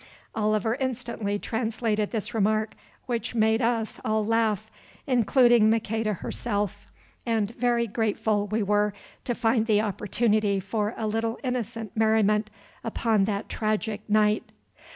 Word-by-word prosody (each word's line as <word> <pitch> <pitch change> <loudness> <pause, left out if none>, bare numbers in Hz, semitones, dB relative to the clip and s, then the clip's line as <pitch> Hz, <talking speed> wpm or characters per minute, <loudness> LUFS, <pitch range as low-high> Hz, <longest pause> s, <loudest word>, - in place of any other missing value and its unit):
Oliver 215 0 +1
instantly 235 -5 -2
translated 220 -1 -1
this 220 +1 -4
remark, 215 0 +1 0.3
which 240 -1 -3
made 220 +1 +3
us 230 -2 -1
all 215 -1 +1
laugh, 220 -1 0 0.3
including 240 -2 +4
Maqueda 225 -1 0
herself, 205 +1 -3 0.4
and 225 -3 0
very 235 0 +1
grateful 215 -1 0
we 215 +1 0
were 205 0 +1 0.3
to 240 - -1
find 225 -1 +1
the 210 -2 +4
opportunity 210 0 +1
for 210 +3 -2
a 220 - -2
little 225 +2 -1
innocent 230 -4 -3
merriment 215 -1 +3 0.3
upon 225 -2 +1
that 205 0 -2
tragic 215 -1 -2
night. 210 0 +2
220 Hz, 125 wpm, -26 LUFS, 210-230 Hz, 0.4 s, including